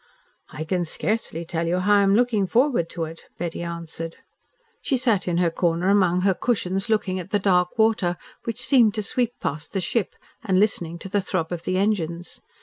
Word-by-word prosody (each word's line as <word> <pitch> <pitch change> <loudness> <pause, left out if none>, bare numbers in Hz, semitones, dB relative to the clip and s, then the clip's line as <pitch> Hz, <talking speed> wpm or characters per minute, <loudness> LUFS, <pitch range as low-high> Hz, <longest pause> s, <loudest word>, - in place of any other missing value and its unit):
"I 155 - -5
can 175 +2 -1
scarcely 170 0 -2
tell 165 0 -2
you 175 +2 +1
how 205 +3 +4
I - - +5
am 195 0 +4
looking 225 -4 +2
forward 235 - +2
to 165 - -4
it," 160 +1 -8
Betty 170 -1 -4
answered. 170 -1 -5 0.6
She 270 - 0
sat 230 -7 +1
in 175 -1 0
her 175 -1 +2
corner 170 +2 +1
among 185 -3 +3
her 190 0 +3
cushions 195 -2 -1
looking 195 -4 +1
at 180 +1 -7
the 205 - +2
dark 180 -2 +2
water 220 -6 +2 0.3
which 230 -2 -3
seemed 235 -6 +5
to 215 - -2
sweep 240 +3 -1
past 150 +1 -4
the 195 - 0
ship, 190 +3 -1 0.3
and 190 -4 +2
listening 175 -5 +1
to 180 - -8
the 200 +1 0
throb 185 -3 -2
of 175 -1 -5
the 185 - 0
engines. 175 -4 -1
185 Hz, 200 wpm, -24 LUFS, 170-210 Hz, 0.6 s, I